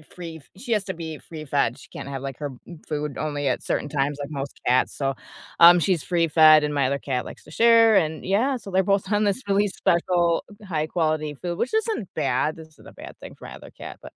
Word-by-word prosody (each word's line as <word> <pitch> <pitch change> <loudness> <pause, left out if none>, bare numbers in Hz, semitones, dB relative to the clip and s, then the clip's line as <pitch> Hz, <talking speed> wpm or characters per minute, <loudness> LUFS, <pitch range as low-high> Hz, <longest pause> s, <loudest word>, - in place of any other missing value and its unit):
free 165 -3 -8
she 235 +5 -8
has 210 -2 0
to 190 - -4
be 160 -2 -7
free 160 -2 -10
fed. 140 -4 0
She - - -16
can't - - -8
have, 135 -1 -5
like, 135 -1 -6
her 145 -2 -4 0.2
m 170 -3 -11
food 150 -2 -4
only 145 -2 -2
at 125 - -1
certain 145 - -2
times 145 0 -1
like 140 - -5
most 140 -1 -6
cats, 125 +1 +2
so, 135 -1 -2 0.4
um, 175 +1 +9
she's 175 -2 0
free 170 -2 +1
fed, 155 -1 +6
and 150 0 -1
my 140 -2 +2
other 140 +1 -1
cat 130 -3 -3
likes - - -11
to - - -15
share, 230 +3 +5
and, 160 -4 +1
yeah, 230 +9 +1
so 215 - -11
they're 190 +1 +2
both 195 0 0
on 205 0 +2
this 205 +4 0
really 200 +1 +3
special, 175 -2 +1 0.2
high 155 -4 -1
quality 155 -2 -1
food, 175 -1 -4
which 250 - -2
isn't 440 - -1
bad 145 +1 0
this 160 -1 -12
isn't 155 - -19
a - - -13
bad - - -11
thing - - -11
for - - -13
my - - -9
other - - -13
cat, - - -10
but - - -12
160 Hz, 245 wpm, -24 LUFS, 145-190 Hz, 0.4 s, um